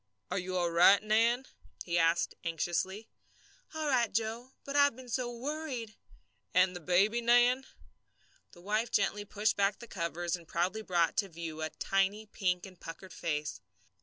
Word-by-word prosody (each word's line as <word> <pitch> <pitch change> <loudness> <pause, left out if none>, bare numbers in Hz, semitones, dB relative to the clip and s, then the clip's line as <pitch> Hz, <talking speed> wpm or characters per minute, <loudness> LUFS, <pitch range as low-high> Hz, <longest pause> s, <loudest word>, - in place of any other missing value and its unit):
"Are 185 - 0
you 185 0 -3
all 175 -1 +1
right, 175 +4 +7
Nan?" 230 +4 +2 0.4
he 175 -1 0
asked 165 +1 +2
anxiously. 175 +6 -2 0.7
"All 315 -1 -2
right, 245 -5 +2
Joe; 230 +4 -2
but 280 - -6
I've 285 -3 +5
been 255 0 -12
so 240 0 -1
worried!" 255 -3 -4 0.6
"And 185 0 +4
the - - -5
baby, 195 +7 +2
Nan?" 245 +2 +4 0.9
The 175 - -15
wife 215 +5 0
gently 205 +1 +1
pushed 210 +1 0
back 200 0 +2
the 235 - -10
covers 170 -3 -2
and 170 -2 -12
proudly 185 +7 -1
brought 175 -5 +1
to 195 - +1
view 165 -2 -6
a 155 - -1
tiny 195 +5 0
pink 180 -4 -1
and 185 -2 -13
puckered 165 +3 -9
face. 150 -10 -3
200 Hz, 165 wpm, -31 LUFS, 175-235 Hz, 0.9 s, right